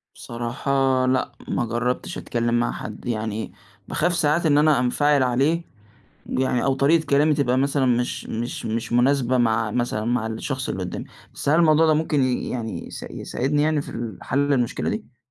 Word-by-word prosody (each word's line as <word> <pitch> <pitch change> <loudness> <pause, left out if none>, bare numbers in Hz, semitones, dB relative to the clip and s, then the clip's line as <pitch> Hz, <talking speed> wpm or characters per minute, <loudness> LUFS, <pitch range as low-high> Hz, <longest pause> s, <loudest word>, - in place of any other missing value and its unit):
بصراحة، 130 +2 0
لأ، 130 0 +1 0.2
ما 120 - -1
جربتش 120 +2 -2
أتكلم 120 0 0
مع 120 - 0
حد 105 0 -8
يعني، 110 -2 -3 0.4
باخاف 175 +3 0
ساعات 155 +2 +2
إن 145 -2 +4
أنا 150 -2 +4
أنفعل 140 +3 +2
عليه، 140 +7 +1 0.6
يعني 130 -1 0
أو 135 - +2
طريقة 155 +4 +3
كلامي 145 +2 +3
تبقى 130 -3 +1
مثلًا 140 0 +1
مش 125 0 0
مش 115 +2 -4
مش 110 +1 -3
مناسبة 130 0 +3
مع 115 -2 +2
مثلًا 120 -2 -1
مع 120 -1 0
الشخص 130 +4 -4
اللي 95 - -3
قدامي. 90 - -5 0.3
بس - - -4
هل 155 +3 +4
الموضوع 160 -1 +5
ده 155 - +4
ممكن 150 -2 +1
ي 130 -1 0
يعني 115 -3 -4
يس - - -8
يساعدني، 145 +3 -1
يعني 155 -1 +1
في - - -12
ال 115 -4 -5
حل 145 +2 +1
المشكلة 125 -4 0
دي؟ 215 - -6
130 Hz, 175 wpm, -23 LUFS, 120-145 Hz, 0.6 s, الموضوع